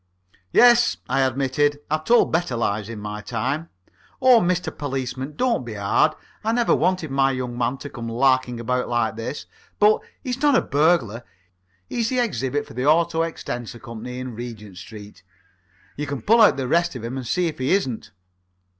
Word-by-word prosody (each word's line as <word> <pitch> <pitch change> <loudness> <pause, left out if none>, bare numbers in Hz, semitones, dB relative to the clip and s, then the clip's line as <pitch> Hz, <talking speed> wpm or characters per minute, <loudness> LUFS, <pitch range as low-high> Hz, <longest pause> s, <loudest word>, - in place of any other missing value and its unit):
"Yes," 240 -1 +5
I 135 +2 0
admitted, 135 +2 +1
"I've 155 0 -1
told 240 +1 +4
better 165 -6 0
lies 105 -2 -1
in 115 - -6
my 105 0 -6
time. 145 +9 -3 0.5
Oh, 255 -3 +6
Mr. 175 0 -1
Policeman, 135 0 -4
don't 245 - +1
be 115 -3 -7
hard. 100 -1 +2 0.3
I 225 +1 0
never 240 0 +2
wanted 180 -5 0
my 135 0 +3
young 130 -2 -3
man 120 +2 -1
to 145 - -8
come 115 -2 -6
larking 130 0 +1
about 125 +2 -1
like 120 -2 0
this. 115 +6 -5 0.3
But 210 +1 +4 0.2
he's 255 -1 -4
not 290 -2 +4
a - - +4
burglar. 140 -7 +1 0.6
He's 230 -2 -1
the 255 - -1
exhibit 145 - -1
from - - -14
the 125 - -1
Auto 165 +1 +3
extensor 120 -8 -4
Co.'s 115 -1 -9
in 125 0 -6
Regent 110 -5 -8
Street. 105 +1 -11 0.7
You 150 +1 -4
can 140 -1 -5
pull 230 +2 +5
out 210 - +6
the 130 -2 -2
rest 170 +2 +1
of 120 - -7
him 120 +3 -4
and 130 -3 -5
see 180 +9 +1
if 160 -4 -3
he 130 - 0
isn't." 135 - 0
135 Hz, 180 wpm, -23 LUFS, 120-170 Hz, 0.7 s, Oh